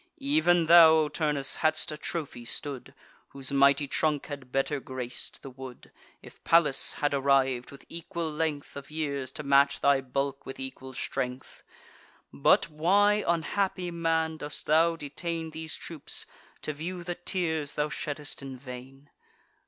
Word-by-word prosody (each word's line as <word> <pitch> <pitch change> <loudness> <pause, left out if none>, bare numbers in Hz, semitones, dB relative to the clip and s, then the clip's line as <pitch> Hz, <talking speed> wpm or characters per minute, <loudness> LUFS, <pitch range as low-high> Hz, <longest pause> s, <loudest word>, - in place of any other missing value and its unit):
Even 275 - +3
thou, 165 0 +9
O 155 -1 +2
Turnus, 150 -2 -1
hadst 155 0 +1
a - - -4
trophy 150 -5 -4
stood, 135 +2 -6 0.3
Whose 135 0 -4
mighty 140 +1 +4
trunk 150 +1 0
had 140 -4 -8
better 135 +2 0
grac'd 130 -2 -6
the 135 - -8
wood, 130 -1 -11 0.3
If - - -15
Pallas 165 -5 +4
had 145 -1 0
arriv'd, 135 -2 +2
with 140 - -13
equal 170 0 -5
length 150 -2 -2
Of 140 -1 -8
years, 140 -4 -3
to 150 - -6
match 140 0 +4
thy 140 -1 +4
bulk 135 +1 -2
with 135 - -8
equal 130 0 -7
strength. 125 +1 -4 0.7
But 70 - +4
why, 200 +7 +3
unhappy 180 +2 0
man, 165 -1 0
dost 145 -1 -5
thou 165 +2 +4
detain 165 +2 -4
These 160 0 -5
troops, 160 -4 -6 0.4
to 155 - -2
view 175 +4 -5
the 175 +1 -3
tears 165 -4 -2
thou 150 0 0
shedd'st 145 -1 -4
in 135 -1 -7
vain? 130 +2 -11
150 Hz, 150 wpm, -28 LUFS, 135-165 Hz, 0.7 s, thou